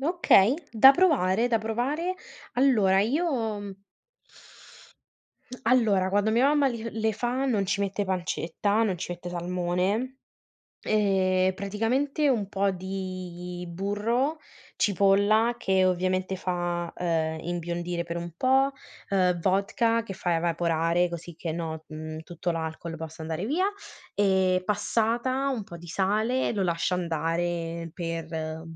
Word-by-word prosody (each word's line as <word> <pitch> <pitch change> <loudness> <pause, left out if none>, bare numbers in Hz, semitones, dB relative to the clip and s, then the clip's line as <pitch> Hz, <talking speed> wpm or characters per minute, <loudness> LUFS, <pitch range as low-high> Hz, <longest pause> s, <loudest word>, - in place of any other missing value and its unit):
Okay, 275 - +4 0.2
da 240 +4 +9
provare, 245 - +3
da 230 - +2
provare. 260 +12 -1 0.4
Allora 215 -8 +4
io, 230 - 0
mhmm 195 -1 -9 1.8
Allora 220 -6 +3
quando 205 +2 +2
mia 240 +5 +4
mamma 290 -1 +3
li 230 -2 -5
le 220 0 +2
fa 245 +5 -1
non 215 -6 +1
ci 200 +1 0
mette 200 0 -1
pancetta, 190 +3 -1
non 195 -5 0
ci - - -5
mette 175 0 -7
salmone, 180 +8 -1 0.6
ehm, 190 -3 +2
praticamente 240 +10 0
un 215 -7 +1
po' 200 0 +1
di 185 -1 -6
burro, 210 - -1 0.4
cipolla 205 +4 +3
che, 190 -1 +2
ovviamente, 185 +1 0
fa, 175 -2 -2
ehm, 160 -2 -1
imbiondire 175 0 -3
per 170 0 -5
un 170 -1 -5
po', 265 +4 +3 0.4
ehm, 180 -3 +2
vodka 225 +5 +1
che 200 -4 -7
fa 175 -2 -1
evaporare, 170 +1 +1
così 170 0 -7
che 165 -1 -4
no 160 -1 -5
mhmm, 155 0 -7
tutto 170 +2 -4
l'alcol 165 0 -4
possa 160 0 -8
andare 160 +3 -3
via, 345 +9 +1 0.5
ehm, 190 -2 +2
passata, 235 +6 0
un 245 -6 -2
po' 170 - -10
di 175 - -12
sale, 210 +8 0
lo 205 -4 -1
lascia 170 0 0
andare 170 0 -2
per, 160 -2 -4
190 Hz, 130 wpm, -27 LUFS, 175-225 Hz, 1.8 s, da